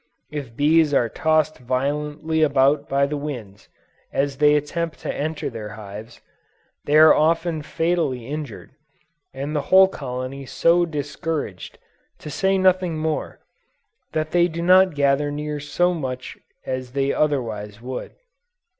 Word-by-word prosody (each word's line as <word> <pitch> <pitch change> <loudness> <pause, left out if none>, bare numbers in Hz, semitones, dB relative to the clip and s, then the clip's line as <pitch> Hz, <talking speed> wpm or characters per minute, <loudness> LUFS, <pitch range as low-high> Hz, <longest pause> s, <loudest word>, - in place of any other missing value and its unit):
If 140 -6 -6
bees 150 +1 +3
are 120 -3 +2
tossed 155 +3 +1
violently 150 +5 -1
about 140 0 +3
by 140 0 +2
the 145 +1 -3
winds, 120 -9 -7 0.4
as 140 0 -1
they 150 +1 +5
attempt 160 +2 -2
to - - -3
enter 155 +1 -3
their 105 -2 -6
hives, 105 +2 -10 0.6
they 150 +1 +3
are 155 0 +8
often 165 +1 +1
fatally 160 -6 -1
injured, 145 -4 -6 0.6
and 140 +3 -5
the 150 - +1
whole 190 0 +8
colony 135 -4 -6
so 170 +4 +3
discouraged, 150 +1 -4 0.4
to 150 - -9
say 190 +6 +1
nothing 185 -3 +2
more, 155 0 -3 0.7
that 155 0 -2
they 175 0 +4
do 170 0 -5
not 185 -1 +5
gather 140 +1 +2
near 150 0 -4
so 175 +5 +1
much 130 -6 -5 0.3
as 130 -1 -4
they 140 0 +1
otherwise 110 -8 -1
would. 125 +1 -7
150 Hz, 135 wpm, -22 LUFS, 135-160 Hz, 0.7 s, are